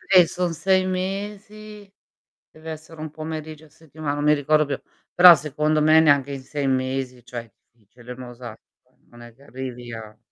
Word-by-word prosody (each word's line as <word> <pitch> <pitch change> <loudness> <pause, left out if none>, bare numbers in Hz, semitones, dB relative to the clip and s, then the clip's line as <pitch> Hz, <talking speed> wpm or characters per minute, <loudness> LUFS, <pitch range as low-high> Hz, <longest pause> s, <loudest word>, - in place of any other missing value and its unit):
eh, 180 -2 +9
son 175 -1 -2
6 185 +3 +2
mesi, 205 +2 -6 0.6
deve 160 +1 -9
essere 155 0 -10
1 155 -1 -6
pomeriggio 155 0 -7
a - - -21
settima 155 -1 -6
non 145 0 -3
mi 150 0 +5
ricordo 155 +1 +2
più, 140 -1 -4 0.3
però 175 -1 +10
secondo 150 +1 -1
me 155 +1 +6
neanche 145 -3 +3
in 135 -1 -6
6 140 0 -3
mesi, 130 -1 -2
cioè, 120 -1 -6
è 115 - -22 0.2
difficile 120 +2 -16
il - - -15
mosaico, 120 -2 -10 0.5
non 120 0 -16
è 120 -1 -13
che 140 - -21
arrivi 125 -3 -8
a 110 -1 -9
150 Hz, 180 wpm, -23 LUFS, 130-160 Hz, 0.6 s, però